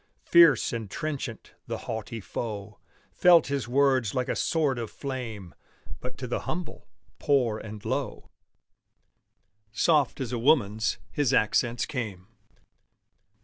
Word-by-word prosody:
Fierce 170 Hz, -7 st, +6 dB
and 110 Hz, -4 st, -4 dB
trenchant, 140 Hz, -5 st, -5 dB
the -, -, -3 dB
haughty 110 Hz, +1 st, -5 dB
foe 105 Hz, -1 st, -6 dB, 0.3 s
Felt 175 Hz, -3 st, +6 dB
his 140 Hz, -3 st, -2 dB
words 130 Hz, -4 st, +2 dB
like 125 Hz, 0 st, -1 dB
a -, -, 0 dB
sword 145 Hz, -6 st, +1 dB
of 115 Hz, -2 st, -4 dB
flame; 115 Hz, -, -6 dB, 0.5 s
But 125 Hz, -, -7 dB
to 130 Hz, -, -5 dB
the 120 Hz, -, -1 dB
humble, 175 Hz, 0 st, -5 dB, 0.3 s
poor, 125 Hz, -7 st, +2 dB
and 105 Hz, -1 st, -9 dB
low -, -, -3 dB, 1.4 s
Soft 150 Hz, +4 st, +2 dB
as 130 Hz, -3 st, -3 dB
a 120 Hz, -, -2 dB
woman's 115 Hz, -4 st, +2 dB
his 145 Hz, -5 st, +1 dB
accents 120 Hz, +2 st, +2 dB
came. 110 Hz, -11 st, -5 dB
125 Hz, 125 wpm, -27 LUFS, 110-140 Hz, 1.4 s, Fierce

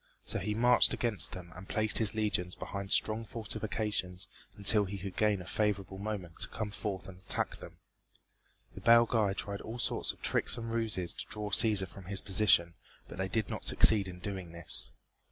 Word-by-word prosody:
So -, -, 0 dB
he 105 Hz, -, -3 dB
marched 120 Hz, +2 st, +4 dB
against 115 Hz, -4 st, 0 dB
them 90 Hz, -2 st, -10 dB
and 95 Hz, +1 st, -12 dB
placed 110 Hz, -1 st, +4 dB
his 110 Hz, -1 st, +2 dB
legions 100 Hz, -5 st, -1 dB
behind 100 Hz, 0 st, -7 dB
strong 110 Hz, +1 st, +3 dB
fortifications 105 Hz, -4 st, -4 dB, 0.3 s
until 105 Hz, +1 st, +6 dB
he 100 Hz, +1 st, -6 dB
could 95 Hz, 0 st, -7 dB
gain 105 Hz, -3 st, +1 dB
a -, -, -14 dB
favorable 100 Hz, -1 st, -2 dB
moment 100 Hz, -5 st, -6 dB
to -, -, 0 dB
come 105 Hz, -2 st, -5 dB
forth 95 Hz, -3 st, -5 dB
and 95 Hz, -1 st, -12 dB
attack 95 Hz, -, -2 dB
them. -, -, -13 dB, 1.0 s
The -, -, -11 dB
Belgæ 115 Hz, -3 st, +4 dB
tried 100 Hz, -1 st, -5 dB
all 115 Hz, +2 st, -7 dB
sorts 120 Hz, -, 0 dB
of -, -, -17 dB
tricks -, -, +2 dB
and 115 Hz, -1 st, -6 dB
ruses 110 Hz, -6 st, -1 dB
to -, -, -8 dB
draw 105 Hz, -1 st, -4 dB
Cæsar 100 Hz, -2 st, +5 dB
from 95 Hz, +1 st, -13 dB
his 95 Hz, +1 st, +2 dB
position, 95 Hz, -4 st, +3 dB, 0.3 s
but -, -, -11 dB
they 95 Hz, -, -1 dB
did 110 Hz, +2 st, -1 dB
not -, -, -6 dB
succeed 105 Hz, -3 st, +4 dB
in 90 Hz, -1 st, -8 dB
doing 95 Hz, -2 st, -7 dB
this. 85 Hz, -1 st, -2 dB
100 Hz, 190 wpm, -31 LUFS, 95-110 Hz, 1.0 s, until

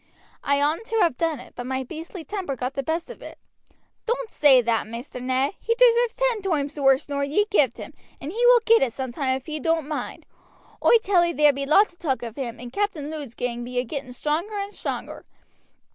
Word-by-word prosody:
"I 280 Hz, 0 st, +2 dB
oughtn't 310 Hz, +10 st, 0 dB
to 450 Hz, -, -3 dB
have 335 Hz, -, +3 dB
done 325 Hz, -1 st, -1 dB
it, 250 Hz, -, -13 dB
but 245 Hz, 0 st, -6 dB
my 265 Hz, 0 st, -2 dB
beastly 325 Hz, +5 st, -8 dB
temper 365 Hz, -4 st, -4 dB
got 255 Hz, +1 st, -4 dB
the 275 Hz, -, -2 dB
best 325 Hz, +4 st, -2 dB
of -, -, -12 dB
it." -, -, -10 dB, 0.7 s
"Doan't 475 Hz, 0 st, -2 dB
say 275 Hz, -4 st, +6 dB
that 230 Hz, -2 st, 0 dB
Maister 235 Hz, +3 st, -7 dB
Ned; 260 Hz, +2 st, 0 dB
he 460 Hz, -, 0 dB
deserves 480 Hz, -1 st, +4 dB
ten -, -, 0 dB
toimes 300 Hz, -6 st, -2 dB
worse 270 Hz, +1 st, +3 dB
nor 280 Hz, -1 st, -2 dB
ye 305 Hz, +9 st, +1 dB
gived 270 Hz, -, +3 dB
him, -, -, -9 dB, 0.3 s
and 285 Hz, -, -6 dB
he 465 Hz, +5 st, -2 dB
will -, -, +7 dB
get 460 Hz, 0 st, +5 dB
it 245 Hz, -4 st, +1 dB
some 260 Hz, -1 st, -4 dB
time 260 Hz, 0 st, -1 dB
if 265 Hz, -, -13 dB
he 310 Hz, 0 st, -4 dB
doan't 325 Hz, 0 st, 0 dB
mind. 305 Hz, -, -5 dB, 0.6 s
Oi 470 Hz, -, +7 dB
tell 370 Hz, -3 st, +4 dB
ee 340 Hz, 0 st, 0 dB
there 295 Hz, -2 st, +5 dB
be 275 Hz, 0 st, -4 dB
lots 370 Hz, +6 st, +4 dB
of 345 Hz, -, -26 dB
talk 265 Hz, -6 st, -1 dB
of 230 Hz, -2 st, -6 dB
him, 250 Hz, -4 st, -5 dB
and 245 Hz, 0 st, -9 dB
Captain 340 Hz, -8 st, -2 dB
Lud's 290 Hz, -7 st, -7 dB
gang 240 Hz, -1 st, -3 dB
be 250 Hz, +1 st, -6 dB
a 245 Hz, -, +2 dB
getting 270 Hz, +1 st, -6 dB
stronger 310 Hz, -, -2 dB
and 400 Hz, +1 st, -4 dB
stronger. -, -, -5 dB
295 Hz, 225 wpm, -24 LUFS, 260-375 Hz, 0.7 s, will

